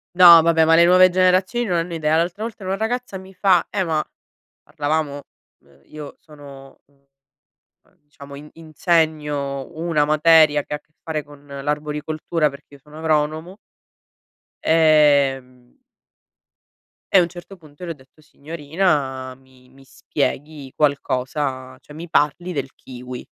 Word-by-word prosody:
No, 170 -2 +9
vabbè, 165 -1 +3
ma 165 - +4
le 170 - +6
nuove 185 +1 +6
generazioni 185 +6 +1
non 175 -4 -1
hanno 170 +1 -3
idea. 155 0 0
L'altra 175 +6 -2
volta 220 -4 -7
una 190 - -1
ragazza 220 0 -4
mi 190 +1 -13
fa: 185 -2 +2
"Eh, 190 -3 -2
ma", 155 -2 -1 0.6
parlavamo, 145 -1 -3 0.4
uhm, 70 0 -26
io 150 -2 -10
sono, 140 -3 -15
uhm, 140 -1 -35 1.0
diciamo 140 -1 -14
in 150 +1 -12
insegno 155 -4 -2
una 160 -3 0
materia 155 -1 +4
che - - -8
ha - - -5
a - - -25
che 150 +1 -43
fare 155 -2 -4
con 145 0 -17
l'arboricoltura, 150 +2 -3
perché 140 +1 -15
io 140 - -18
sono 150 +3 -14
agronomo. 160 +4 -1 1.1
Ehm 140 -6 +2 1.4
e - - +7
a - - +7
un 170 - 0
certo 175 +3 -12
punto 155 0 -16
le 170 - -5
ho - - -4
detto: 135 +2 -23
"Signorina 145 -4 -3
mi 130 -1 -24
mi 135 +1 -20
spieghi 145 0 -5
qualcosa, 130 -2 -2
cioè 150 - -16
mi 165 +2 -9
parli 175 +3 0
del 135 -3 -5
kiwi". 125 0 -10
150 Hz, 145 wpm, -20 LUFS, 140-170 Hz, 1.4 s, No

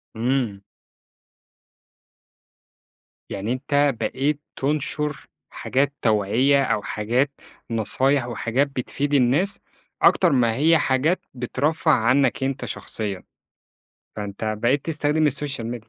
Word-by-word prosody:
إمم. 120 -4 -1 2.7
يعني 105 +5 -2
أنت 140 +2 +1
بقيت 145 +2 -1
تنشر 150 +1 -2 0.2
حاجات 140 +2 -1
توعية، 115 +6 +3
أو 105 - 0
حاجات 120 +7 0 0.4
نصايح، 130 +4 +1
وحاجات 120 +3 0
بتفيد 140 +2 -3
الناس، 140 +9 +2 0.4
أكتر 175 -4 +5
ما 120 -4 +2
هي 160 +5 +4
حاجات 145 +6 +1
بترفّه 145 +6 0
عنّك 130 +1 +2
أنت 135 0 -2
شخصيًا، 100 -4 -4 0.9
فأنت 105 +1 -3
بقيت 130 +5 +1
تستخدم 155 -1 +1
السوشيال 140 -4 -2
ميديا 115 -1 -6
135 Hz, 100 wpm, -23 LUFS, 115-145 Hz, 2.7 s, أكتر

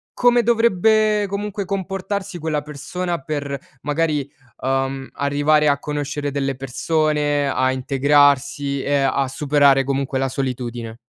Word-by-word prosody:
come 245 -1 +4
dovrebbe 215 -2 +3
comunque 200 0 -4
comportarsi 195 0 -3
quella 155 -2 -2
persona 170 +4 -4
per 145 -2 -3 0.2
magari, 150 -1 -1 0.3
uhm, 135 0 -2
arrivare 145 +2 +2
a 140 0 +2
conoscere 145 0 -3
delle 135 -1 -2
persone, 145 +2 0
a 130 0 +1
integrarsi 140 +1 +2
e 145 0 +1
a 135 0 +1
superare 140 0 +3
comunque 135 0 -1
la 135 - +1
solitudine? 120 -4 -4
145 Hz, 120 wpm, -21 LUFS, 135-170 Hz, 0.3 s, come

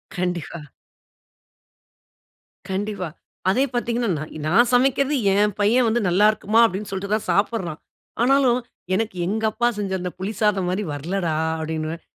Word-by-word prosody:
கண்டிப்பா. 175 -3 -3 2.1
கண்டிப்பா. 195 -2 -3 0.4
அதே 255 +8 +3
பார்த்தீங்கனா, 240 -2 -1
நா - - -4 0.2
நான் 235 +8 +4
சமைக்கிறது 270 +3 +3 0.2
என் 210 0 +2
பையன் 235 +4 +3
வந்து 230 +2 +2
நல்லா 195 +4 +4
இருக்கும்மா 215 +2 +2
அப்படினு 205 0 -3
சொல்லிட்டு 200 +2 -3
தான் 215 - -4
சாப்பிட்றான். 195 -6 0 0.4
ஆனாலும் 255 -2 +4 0.4
எனக்கு 220 -2 -2
எங்கப்பா 220 +3 0
செஞ்ச 190 -3 -2
புளி 200 +4 -3
சாதம் 200 -4 +2
மாரி 195 +3 -1
வரலடா 165 +2 -2 0.2
அப்படினுவேன். 160 +1 -4
205 Hz, 125 wpm, -22 LUFS, 180-230 Hz, 2.1 s, நான்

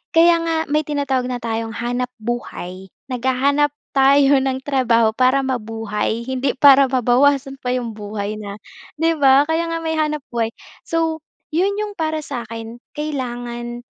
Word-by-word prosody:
Kaya 335 +1 +6
nga 330 0 -1 0.2
may 305 +1 +3
tinatawag 275 -4 -1
na 250 - -2
tayong 225 0 -3
hanap 245 +1 -2
buhay, 200 -5 -5 0.2
naghahanap 265 +4 +1 0.2
tayo 275 0 +5
ng 265 0 -1
trabaho 240 -5 +2
para 260 +2 +3
mabuhay 225 -2 -2
hindi 260 +1 0
para 275 0 +7
mabawasan 270 +2 +2
pa 250 - -2
'yong 240 -2 -3
buhay 210 0 -5
na 200 -1 -7 0.4
'di 325 0 +1
ba, 275 0 +6
kaya 325 +2 0
nga 330 - -1
may 320 0 -1
hanap 300 -2 -1
buhay. 230 -2 0 0.4
So 325 -1 0 0.3
'yon 375 +6 +1
'yong 420 -1 -3
para 315 -1 -1
sa 240 -4 -5
akin 230 +1 -8 0.2
kailangan 240 -4 -4
260 Hz, 150 wpm, -20 LUFS, 235-290 Hz, 0.4 s, para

